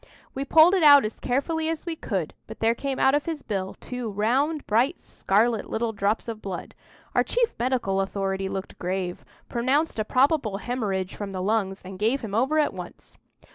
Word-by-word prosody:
We 270 Hz, +1 st, -3 dB
pulled 320 Hz, +5 st, +6 dB
it 380 Hz, -, +3 dB
out 285 Hz, -5 st, +8 dB
as 215 Hz, -, -5 dB
carefully 315 Hz, +5 st, -1 dB
as 325 Hz, +1 st, -3 dB
we 335 Hz, -2 st, -3 dB
could, 190 Hz, -, -3 dB
but -, -, -10 dB
there 225 Hz, +1 st, +3 dB
came 270 Hz, +2 st, -3 dB
out 265 Hz, -, +4 dB
of 290 Hz, +2 st, 0 dB
his 320 Hz, -3 st, -3 dB
bill 195 Hz, -3 st, -3 dB
two 250 Hz, -2 st, -5 dB
round, 260 Hz, +9 st, 0 dB
bright 245 Hz, +10 st, +2 dB
scarlet, 220 Hz, +3 st, 0 dB
little 225 Hz, 0 st, -1 dB
drops 205 Hz, +3 st, 0 dB
of 225 Hz, -2 st, -5 dB
blood. 190 Hz, -3 st, -6 dB, 0.4 s
Our -, -, +4 dB
chief 480 Hz, -1 st, 0 dB
medical 235 Hz, -6 st, 0 dB
authority 195 Hz, 0 st, -2 dB
looked 190 Hz, 0 st, -6 dB
grave, 180 Hz, 0 st, -3 dB, 0.2 s
pronounced 260 Hz, +4 st, 0 dB
a -, -, +2 dB
probable 255 Hz, -3 st, +2 dB
hemorrhage 200 Hz, -5 st, -2 dB
from 200 Hz, -2 st, -6 dB
the 185 Hz, -, -3 dB
lungs, 195 Hz, -2 st, 0 dB
and 185 Hz, 0 st, -8 dB
gave 230 Hz, +6 st, +1 dB
him 220 Hz, -4 st, -6 dB
over 265 Hz, +8 st, +2 dB
at 300 Hz, -, +2 dB
once. -, -, -10 dB
230 Hz, 190 wpm, -25 LUFS, 195-280 Hz, 0.4 s, out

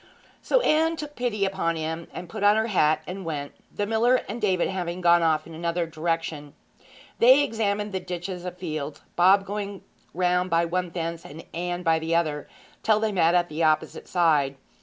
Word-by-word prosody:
So -, -, +2 dB
Anne 325 Hz, -4 st, +2 dB
took 300 Hz, -2 st, -7 dB
pity 220 Hz, -5 st, -1 dB
upon 190 Hz, -4 st, -1 dB
him, 160 Hz, +1 st, -4 dB
and 175 Hz, -, -7 dB
put 200 Hz, +5 st, -7 dB
on 205 Hz, +1 st, +6 dB
her 220 Hz, 0 st, +1 dB
hat 155 Hz, -8 st, +2 dB
and 190 Hz, +1 st, -6 dB
went, 145 Hz, -4 st, -4 dB, 0.2 s
the 205 Hz, -, -2 dB
miller 230 Hz, +4 st, +3 dB
and 230 Hz, +4 st, -5 dB
David 185 Hz, -4 st, +2 dB
having 180 Hz, -2 st, -3 dB
gone 175 Hz, -1 st, +5 dB
off 160 Hz, -2 st, +2 dB
in 165 Hz, -, -11 dB
another 170 Hz, +1 st, -1 dB
direction. 160 Hz, -2 st, -3 dB, 0.6 s
They 260 Hz, +5 st, +7 dB
examined 210 Hz, -4 st, -1 dB
the 190 Hz, -, -2 dB
ditches 180 Hz, 0 st, -6 dB
of 180 Hz, 0 st, -6 dB
fields, 155 Hz, -5 st, -5 dB
Bob 190 Hz, +3 st, +5 dB
going 200 Hz, 0 st, -5 dB, 0.3 s
round 180 Hz, 0 st, +1 dB
by 170 Hz, 0 st, +2 dB
one 180 Hz, +1 st, -2 dB
fence 165 Hz, -1 st, -4 dB
and 155 Hz, +3 st, -11 dB
Anne 175 Hz, +1 st, -3 dB
by 165 Hz, -2 st, +3 dB
the 165 Hz, +1 st, -1 dB
other, 155 Hz, -3 st, -1 dB, 0.3 s
till 215 Hz, -1 st, +3 dB
they 220 Hz, 0 st, 0 dB
met 175 Hz, -3 st, +3 dB
at 175 Hz, -1 st, +3 dB
the 155 Hz, +1 st, -5 dB
opposite 155 Hz, -1 st, +1 dB
side. 150 Hz, -6 st, +2 dB
175 Hz, 190 wpm, -25 LUFS, 165-200 Hz, 0.6 s, They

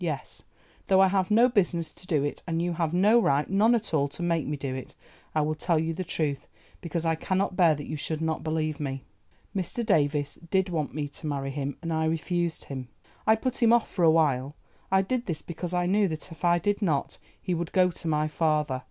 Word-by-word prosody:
Yes, 150 Hz, -6 st, -4 dB, 0.5 s
though 190 Hz, -1 st, +5 dB
I 190 Hz, 0 st, +6 dB
have 190 Hz, -1 st, +1 dB
no 230 Hz, +4 st, +6 dB
business 175 Hz, -8 st, 0 dB
to 180 Hz, -, -13 dB
do 155 Hz, -7 st, +1 dB
it, 145 Hz, -, -3 dB
and 165 Hz, -1 st, -1 dB
you 175 Hz, +1 st, 0 dB
have 165 Hz, -2 st, -1 dB
no 205 Hz, +7 st, +5 dB
right—none 195 Hz, +8 st, +3 dB
at 220 Hz, -6 st, -3 dB
all—to 145 Hz, +2 st, 0 dB
make 170 Hz, -3 st, 0 dB
me 150 Hz, 0 st, -2 dB
do 135 Hz, -2 st, -4 dB
it, 130 Hz, -1 st, -7 dB, 0.4 s
I 155 Hz, -, +3 dB
will 155 Hz, +1 st, 0 dB
tell 165 Hz, +2 st, 0 dB
you 160 Hz, +1 st, 0 dB
the 185 Hz, +3 st, -3 dB
truth, 150 Hz, -5 st, -2 dB, 0.3 s
because 170 Hz, -1 st, -3 dB
I 165 Hz, -, +3 dB
cannot 185 Hz, +3 st, -1 dB
bear 170 Hz, -4 st, +5 dB
that 145 Hz, 0 st, -7 dB
you 155 Hz, -, -4 dB
should 155 Hz, +1 st, -2 dB
not 160 Hz, 0 st, -2 dB
believe 155 Hz, -1 st, -1 dB
me. 135 Hz, -2 st, -4 dB, 0.5 s
Mr. 195 Hz, +5 st, -2 dB
Davies 145 Hz, -7 st, +1 dB
did 190 Hz, 0 st, +2 dB
want 155 Hz, -5 st, -2 dB
me 150 Hz, -1 st, -2 dB
to 155 Hz, +2 st, -7 dB
marry 135 Hz, -2 st, -2 dB
him 140 Hz, 0 st, -4 dB
and 165 Hz, -1 st, -2 dB
I 160 Hz, 0 st, +1 dB
refused 165 Hz, +1 st, -1 dB
him. 130 Hz, -2 st, -6 dB, 0.4 s
I 220 Hz, -, +7 dB
put 255 Hz, +3 st, -3 dB
him 230 Hz, -1 st, +5 dB
off 235 Hz, -1 st, +3 dB
for 180 Hz, -, -1 dB
a 165 Hz, -, +7 dB
while; 145 Hz, -3 st, +2 dB, 0.4 s
I 190 Hz, 0 st, +4 dB
did 245 Hz, +4 st, -2 dB
this 165 Hz, -4 st, -3 dB
because 170 Hz, +1 st, -5 dB
I 180 Hz, 0 st, +1 dB
knew 200 Hz, +3 st, +3 dB
that 160 Hz, +1 st, -6 dB
if 165 Hz, +1 st, -12 dB
I 175 Hz, 0 st, +4 dB
did 205 Hz, +5 st, 0 dB
not 155 Hz, -8 st, 0 dB, 0.2 s
he 185 Hz, -, -2 dB
would 170 Hz, -1 st, -3 dB
go 180 Hz, -1 st, +4 dB
to 165 Hz, -, -7 dB
my 155 Hz, -1 st, +1 dB
father. 150 Hz, -4 st, 0 dB
165 Hz, 230 wpm, -27 LUFS, 150-185 Hz, 0.5 s, I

